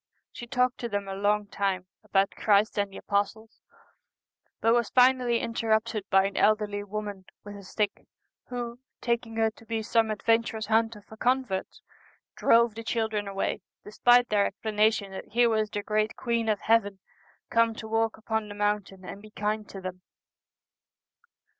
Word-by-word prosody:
She 240 - -9
talked 250 +1 +1
to 235 - -3
them 205 -2 -2
a 195 - -4
long 205 +1 +1
time 195 -2 -2 0.2
about 195 0 +2
Christ 210 0 +2
and 200 -1 0
the - - -9
apostles, 215 +2 -2 1.0
but 225 - +3
was 235 -2 +2
finally 250 -1 +4
interrupted 220 -2 -1
by 195 0 +4
an 195 - -3
elderly 210 -1 +2
woman 205 -2 -6 0.2
with 205 0 -9
a 200 - -9
stick, 200 +2 -3 0.4
who, 240 -1 -5 0.2
taking 235 -1 -2
her 225 0 +2
to 220 - -18
be 225 -1 -3
some 225 +1 +2
adven 225 +2 +3
turous 220 -2 -5
hunter 225 -1 +1
for 220 - -14
converts, 245 -6 -1 0.5
drove 235 -1 +4
the 230 +1 -7
children 220 -3 -1
away, 195 0 -2 0.2
despite 245 +4 +4
their 205 -1 +3
explanation 215 -1 0
that 190 - -7
here 240 0 +4
was 215 -1 +1
the 205 -1 -4
great 215 +1 0
Queen 235 -2 -1
of 210 -2 0
Heaven 215 -3 +2 0.5
come 230 -1 +3
to 220 - -7
walk 225 0 0
upon 220 -1 -2
the 205 - -8
mountain 205 -2 -2
and 200 - -8
be 215 - -13
kind 210 0 -3
to 195 - -8
them. 185 0 -6
215 Hz, 165 wpm, -27 LUFS, 205-230 Hz, 1.0 s, finally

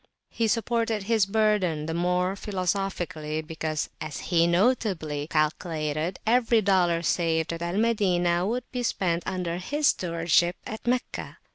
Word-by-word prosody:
He 230 - 0
supported 230 -1 0
his 220 -1 +2
burden 195 -7 +1
the 160 - -3
more 180 +2 +1
philosophically, 180 -6 -2
because, 155 -1 -3
as 155 -3 -5
he 170 -1 +4
notably 175 - +1
calculated, 155 +1 -1
every 230 0 +4
dollar 175 -4 +2
saved 165 -1 +1
at 165 - -6
Al 170 +3 -2
Madinah 185 -6 +2
would 245 +3 -1
be 250 - -2
spent 175 -7 0
under 175 -2 -2
his 290 +11 +1
stewardship 170 0 +1
at 220 +2 -7
Meccah. 250 +1 -2
180 Hz, 135 wpm, -26 LUFS, 165-215 Hz, -, he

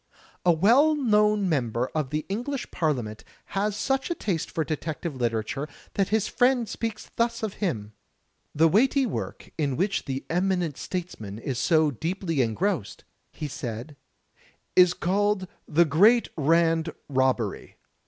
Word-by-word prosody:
A 175 - +5
well 240 - +5
known 210 -6 +3
member 125 -6 0
of 155 -4 -1
the 150 +2 -2
English 245 +6 -3
Parliament 125 -10 -2 0.3
has 200 +1 0
such 270 +3 0
a 345 - -1
taste 180 - -2
for 160 - -1
detective 155 0 -4
literature 120 +3 -2 0.3
that 195 -2 +1
his 215 -1 +1
friend 245 -2 +2
speaks 225 -1 -5
thus 235 0 0
of 215 -3 -2
him: 110 - -2 0.6
"The 160 +2 +5
weighty 260 - +3
work 220 - -5
in 140 -4 0
which 195 +4 0
the 135 0 -4
eminent 180 -3 0
statesman 140 - -5
is 125 +2 -3
so 155 -3 +3
deeply 165 - -1
engrossed," 125 - -1 0.3
he 150 - -5
said, 125 0 -6 0.8
"is 180 -1 +6
called 200 +1 +1 0.2
*The 170 +3 +4
Great 205 - +5
Rand 165 +1 +2 0.2
Robbery.' 130 -6 0
170 Hz, 140 wpm, -26 LUFS, 140-210 Hz, 0.8 s, is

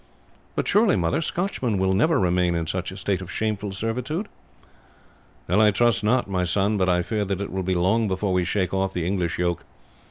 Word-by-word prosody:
"But - - -1
surely, 210 -1 +4
mother, 85 - 0
Scotchmen 155 - -1
will 95 0 +1
never 155 - +3
remain 90 -1 +2
in 85 -1 -1
such 90 +3 -3
a 95 - -9
state 95 -1 -1
of 95 - -8
shameful 105 -2 -2
servitude!" 125 - -3 1.2
"I 105 +5 +4
trust 110 -1 +2
not, 120 +3 +2
my 95 -2 -1
son; 100 +4 +1
but 95 -2 +1
I 90 0 +2
fear 105 +2 -1
that 100 -1 -2
it 100 - -4
will 95 +1 -2
be 95 0 -1
long 95 +6 +2
before 95 0 -1
we 90 -1 +2
shake 95 +1 -1
off 95 0 0
the 85 -2 -1
English 90 -2 -1
yoke. 85 -1 -1
95 Hz, 200 wpm, -24 LUFS, 90-110 Hz, 1.2 s, surely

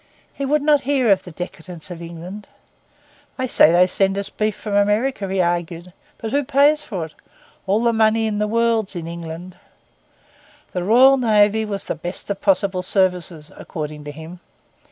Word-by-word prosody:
He 275 - -4
would 295 +1 +1
not 295 -1 +4
hear 265 -5 +2
of 195 - +4
the 180 - -11
decadence 175 +1 -8
of 170 -1 -8
England. 170 +5 -9 0.9
'They 260 - -1
say 165 - +5
they 175 +1 +5
send 195 +1 0
us 200 - -3
beef 215 -1 -1
from 210 - -6
America,' 205 +1 +1
he 195 - -1
argued; 175 0 -2 0.2
'but 220 -1 -5
who 285 +2 +1
pays 290 +3 +3
for 195 - -5
it? 155 - -14 0.5
All 205 +4 +2
the 235 -1 +3
money 225 0 +3
in 210 -1 -1
the 210 - +1
world's 225 -2 +1
in 165 -2 -5
England.' 170 +1 -8 1.2
The 180 - -2
Royal 255 +7 +6
Navy 220 -2 +3
was 200 -2 -4
the - - -2
best 175 +3 -6
of 195 - -4
possible 190 -1 +1
services, 180 -4 -1
according 150 -2 -7
to 145 - -6
him. 160 +4 -10
200 Hz, 175 wpm, -21 LUFS, 175-225 Hz, 1.2 s, Royal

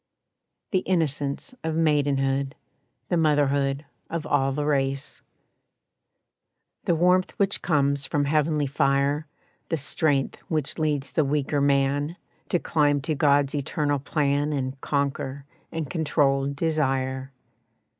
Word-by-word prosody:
The 190 - +3
innocence 160 - -1
of 160 -1 -1
maidenhood, 140 -3 +1 0.5
The 175 - +2
motherhood 145 -2 +2 0.2
of 165 -1 -3
all 135 -2 +2
the 145 +2 -2
race. 140 -1 -1 1.6
The 170 - +3
warmth 180 +2 +2
which 200 -1 +1
comes 140 -3 +1
from 145 -3 0
heavenly 150 0 +1
fire, 140 +2 +1 0.4
The 165 - 0
strength 140 -1 0
which 155 -3 0
leads 150 -3 0
the 155 - +2
weaker 145 0 0
man 140 +3 +1 0.3
To - - +2
climb 145 -4 +2
to 155 +3 -1
God's 140 -1 +3
Eternal 145 0 -1
plan 145 +1 0
And 135 -1 -3
conquer 140 -1 -2 0.3
and 160 -2 -3
control 140 -2 +1
desire. 135 -3 -1
145 Hz, 115 wpm, -25 LUFS, 140-155 Hz, 1.6 s, The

